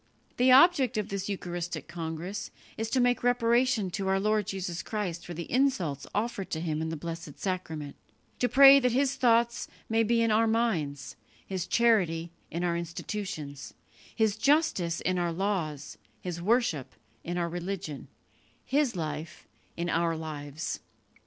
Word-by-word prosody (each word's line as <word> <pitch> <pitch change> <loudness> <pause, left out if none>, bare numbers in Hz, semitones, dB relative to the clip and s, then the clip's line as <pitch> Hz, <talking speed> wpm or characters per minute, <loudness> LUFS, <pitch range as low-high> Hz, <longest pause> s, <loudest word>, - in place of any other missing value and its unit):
The 255 +1 +5
object 270 -3 +6
of 210 0 -2
this 195 0 -3
eucharistic 175 -3 -4
congress 170 +4 -5 0.3
is 225 0 -3
to 260 - +1
make 245 0 +3
reparation 240 -3 +2
to 195 +1 -3
our 190 0 +2
Lord 210 0 +1
Jesus 185 -3 -3
Christ 190 -6 -3
for 175 - -7
the 170 - -4
insults 240 - +1
offered 210 -2 -2
to 160 - -2
Him 160 -2 -2
in 160 - -2
the 160 - -4
Blessed 165 -2 -7
Sacrament; 160 -6 -4 0.4
to 245 - +2
pray 275 +1 +9
that 250 -3 +1
His 270 +1 +2
thoughts 235 -2 +2 0.2
may 225 0 +3
be 230 +1 +2
in 230 - +2
our 225 +1 +4
minds, 185 - -1 0.3
His 185 -1 -3
charity 180 -9 +2 0.2
in 170 +2 -3
our 175 -1 +1
institutions, 170 -3 -5 0.4
His 220 -3 +2
justice 240 - +2
in 185 0 0
our 175 -1 0
laws, 165 -6 -3 0.2
His 175 -2 -5
worship 210 - +1 0.3
in 175 +1 -3
our 170 -1 0
religion, 175 -3 -5 0.6
His 275 -4 +1
life 155 -1 -5 0.3
in 170 0 -2
our 165 -1 +1
lives." 150 -1 -5
190 Hz, 155 wpm, -29 LUFS, 165-230 Hz, 0.6 s, pray